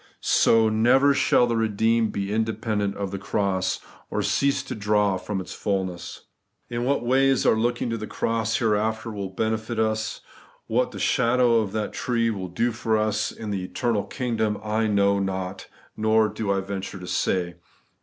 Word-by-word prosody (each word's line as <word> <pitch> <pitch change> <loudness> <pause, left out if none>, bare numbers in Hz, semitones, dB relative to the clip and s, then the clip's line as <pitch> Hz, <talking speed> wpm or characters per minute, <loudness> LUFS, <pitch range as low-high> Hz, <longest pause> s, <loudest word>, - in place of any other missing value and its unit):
So, 115 -1 +4
never 125 +6 +4
shall 125 - +3
the 120 -1 -1
redeemed 115 +1 +1
be 100 0 -3
independent 110 -2 -1
of 100 -2 -3
the 100 - -4
cross, 95 -2 -1 0.3
or 105 - -1
cease 130 +8 +1
to 135 - -6
draw 105 -2 +1
from 95 +1 -4
its 95 - -7
fulness. 95 -3 -3 0.5
In 120 0 -2
what 135 -2 0
ways 135 +1 +3
our - - +5
looking 120 +1 0
to 115 - -2
the 110 - -5
cross 115 0 -1
here 110 -3 +2
after 110 +2 -2
will 100 -2 -4
benefit 110 +3 -2
us; 110 0 -1 0.4
what 125 +3 +1
the 110 - -9
shadow 120 +3 +3
of 105 -3 -2
that 110 -1 -2
tree 115 -2 0
will 95 -4 -4
do 115 +8 0
for 110 -1 0
us 110 0 0
in 110 -2 -6
the 95 -2 -2
eternal 110 +2 -1
kingdom, 115 -5 -1
I 110 +1 0
know 100 -1 +3
not, 95 -1 -3 0.3
nor 110 0 +3
do 105 -1 -2
I 100 -1 +1
venture 95 0 -5
to 90 - -9
say. 90 -1 -1
110 Hz, 175 wpm, -24 LUFS, 100-115 Hz, 0.5 s, our